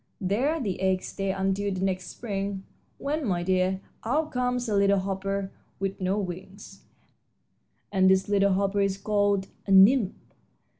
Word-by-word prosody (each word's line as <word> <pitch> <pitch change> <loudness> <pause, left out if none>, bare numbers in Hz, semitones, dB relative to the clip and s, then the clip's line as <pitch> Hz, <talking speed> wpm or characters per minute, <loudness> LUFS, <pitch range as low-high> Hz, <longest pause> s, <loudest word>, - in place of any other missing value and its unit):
There 240 - 0
the 200 -9 -3
eggs 190 -1 +1
stay 195 -1 -3
until 195 +1 -1
next 185 -1 -2
spring, 200 -3 -4 0.3
when, 300 +2 -2
my 180 -7 0
dear, 185 +1 +1 0.2
out 300 +7 0
comes 250 -1 -1
a 210 - 0
little 200 0 +4
hopper 195 0 -2 0.3
with 195 0 -3
no 185 +2 0
wings, 195 +1 -7 1.1
and 190 -2 +4
this 190 0 +3
little 200 -1 +3
hopper 200 +1 +1
is 195 -1 0
called 205 -1 +1 0.2
a - - -1
nymph. 195 +2 +6
195 Hz, 145 wpm, -27 LUFS, 190-205 Hz, 1.1 s, nymph